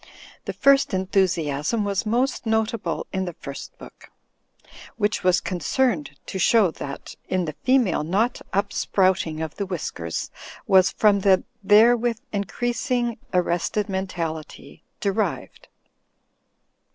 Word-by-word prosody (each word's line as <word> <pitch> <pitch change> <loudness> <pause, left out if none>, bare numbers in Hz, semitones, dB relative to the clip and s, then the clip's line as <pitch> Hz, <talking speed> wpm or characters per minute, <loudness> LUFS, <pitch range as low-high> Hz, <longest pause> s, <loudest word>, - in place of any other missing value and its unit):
The - - -3
first 275 0 +4
enUiusiasm 185 -1 0
was 200 +2 -1
most 245 +2 0
notable 220 0 -1
in 190 -1 -1
the 175 - -5
first 140 -1 -9
book, - - -14 0.9
which 210 -2 0
was 185 0 +4
concerned 180 - -1
to 190 - -5
show 205 -2 +4
that 140 -3 -8 0.2
"in 185 -1 0
the 155 - -4
female 250 - +2
not 205 +10 0
upsprouting 190 -4 +1
of 160 - -7
the 200 - -2
whiskers 85 - -4 0.3
was 190 0 +5
from 205 -2 +3
the 190 -1 +3 0.2
therewith 230 +3 +5 0.2
increasing 240 +3 -1
arrested 180 +3 0
mentality 170 -5 -5 0.2
derived.'' 200 +2 -2
195 Hz, 115 wpm, -23 LUFS, 175-225 Hz, 0.9 s, was